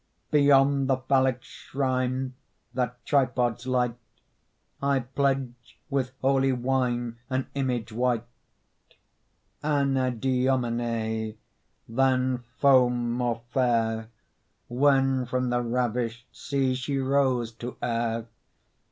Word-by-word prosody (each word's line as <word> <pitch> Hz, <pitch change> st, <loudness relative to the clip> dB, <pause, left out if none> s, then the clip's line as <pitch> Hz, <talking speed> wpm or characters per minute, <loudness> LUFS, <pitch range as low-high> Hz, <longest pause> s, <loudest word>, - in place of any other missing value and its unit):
Beyond 140 Hz, -1 st, +4 dB
the 135 Hz, -, +3 dB
phallic 130 Hz, -1 st, +1 dB
shrine 130 Hz, -1 st, -2 dB, 0.4 s
That 125 Hz, 0 st, -3 dB
tripods 125 Hz, -3 st, +1 dB
light, 125 Hz, -2 st, +1 dB, 0.8 s
I 140 Hz, -1 st, +2 dB
pledge 130 Hz, -1 st, -2 dB
with 130 Hz, -2 st, -1 dB
holy 135 Hz, 0 st, +3 dB
wine 120 Hz, -2 st, -1 dB
An 130 Hz, 0 st, -1 dB
image 125 Hz, -5 st, -2 dB
white; 120 Hz, 0 st, 0 dB, 1.4 s
Anadyomene, 125 Hz, -5 st, 0 dB, 0.5 s
Than 130 Hz, 0 st, +1 dB
foam 125 Hz, -4 st, +4 dB
more 120 Hz, -1 st, -1 dB
fair, 115 Hz, -3 st, +1 dB, 0.6 s
When 135 Hz, 0 st, +2 dB
from 125 Hz, 0 st, -1 dB
the 120 Hz, 0 st, +1 dB
ravished 120 Hz, 0 st, -1 dB
sea 135 Hz, -2 st, 0 dB
She 130 Hz, +2 st, -2 dB
rose 130 Hz, -3 st, +1 dB
to 120 Hz, +1 st, -7 dB
air. 115 Hz, -1 st, -1 dB
125 Hz, 90 wpm, -27 LUFS, 120-135 Hz, 1.4 s, Beyond